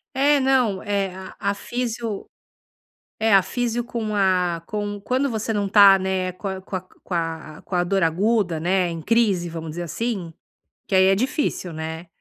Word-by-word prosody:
É, 285 +1 +4
não, 255 -7 +2
é 200 -3 -1
a 190 0 -9
a 200 -1 0
fisio 230 -3 -4 0.9
é 220 -1 +3
a 195 - +7
fisio 240 +4 -2
com 225 -3 -3
a 180 -4 +1
com 205 -1 -3
Quando 260 +6 0
você 225 0 -2
não 205 -1 0
tá, 200 -1 +8
né, 190 -1 -1
com 190 +1 -5
com 185 -1 -7
a 160 -2 -4
com - - -11
a 175 - +3
dor 195 0 +1
aguda, 180 0 +1
né, 180 +1 +1
em 165 -1 -5
crise 205 -4 +2
vamos 165 -1 -6
dizer 175 +2 -5
assim, 185 -1 -3 0.5
que - - -5
aí 190 0 +6
é 195 0 +5
difícil, 250 - -1
né, 160 +2 -6
195 Hz, 170 wpm, -23 LUFS, 180-225 Hz, 0.9 s, tá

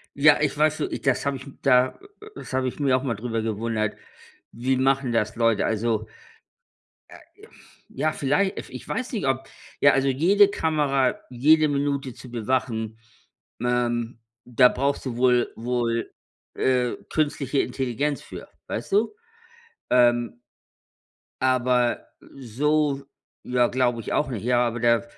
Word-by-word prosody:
Ja, 150 +1 +5
ich 150 -1 +1
weißt 155 0 +2
du, - - +1
i - - -5
das 135 0 0
habe 140 -1 0
ich 130 - -12 0.2
da 130 -1 +3 0.4
das - - -9
habe 130 0 0
ich 125 - -6
mir 135 -3 +3
auch 130 - 0
mal 120 -5 -1
darüber 115 +1 -3
gewundert. 110 0 -2 0.6
Wie 130 +3 -1
machen 135 -1 +1
das 115 -2 0
Leute? 115 -2 +2
Also 110 0 -1 1.0
äh, - - -12 0.7
ja, 155 +4 -1
vielleicht, 175 +9 0
ef - - -7
ich - - -10
weiß 255 +1 -3
nicht, 215 - -2
ob 135 0 0 0.4
ja, 140 - +7
also, 135 0 +1
jede 180 +10 +4
Kamera, 145 -8 +1
jede 155 +5 +4
Minute 140 -2 -1
zu 125 +1 -13
bewachen, 115 -2 -2 0.7
ähm, 120 -1 -1 0.3
da 125 +1 +5
brauchst 140 +2 -1
du 120 -2 -4
wohl 125 -1 +3
wohl, 115 0 -2 0.4
äh, 125 -2 +1 0.2
künstliche 145 -3 0
Intelligenz 135 +2 -2
für, - - -10 0.2
weißt 115 - -5
du? 225 - +2 0.8
Ähm 120 -1 +3 1.0
aber 125 -1 +1 0.3
so 140 +3 0 0.4
ja, 125 -1 +2
glaube 125 -2 0
ich - - -5
auch 150 - +1
nicht. 115 -5 -5
Ja, 120 0 +2
aber 120 +1 -4
da 115 -1 +3
130 Hz, 145 wpm, -24 LUFS, 120-140 Hz, 1.0 s, ja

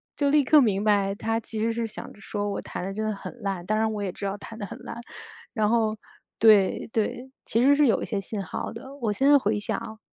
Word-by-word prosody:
就 285 -1 +1
立 295 0 +4
刻 300 +2 +6
明 205 -5 +2
白， 200 -2 +2
她 225 +2 -1
其 220 -1 -6
实 230 +1 +1
是 230 -1 -2
想 - - -8
着 - - -18
说， 205 +1 -3
我 - - -3
弹 - - -6
得 195 +1 -4
真 215 +1 -2
的 215 - 0
很 240 +4 -9
烂， 195 -4 -3
当 215 +2 +1
然 220 0 +1
我 205 -1 -3
也 190 - -2
知 200 - -7
道 195 +1 -1
弹 225 +2 -10
得 205 - -3
很 235 - -8
烂， 235 -1 -8 0.5
然 215 -3 +1
后 220 -1 +2 0.4
对 210 -4 +5
对， 245 +4 -2
其 230 - +1
实 280 +2 +6
是 290 -2 +4
有 215 - +2
一 - - -2
些 205 - -2
信 200 0 -5
号 - - -4
儿 - - -8
的， 265 +4 -9
我 225 -6 -1
现 265 - 0
在 290 - +8
回 210 -3 0
想 220 +1 -4
220 Hz, 285 characters per minute, -26 LUFS, 205-235 Hz, 0.5 s, 在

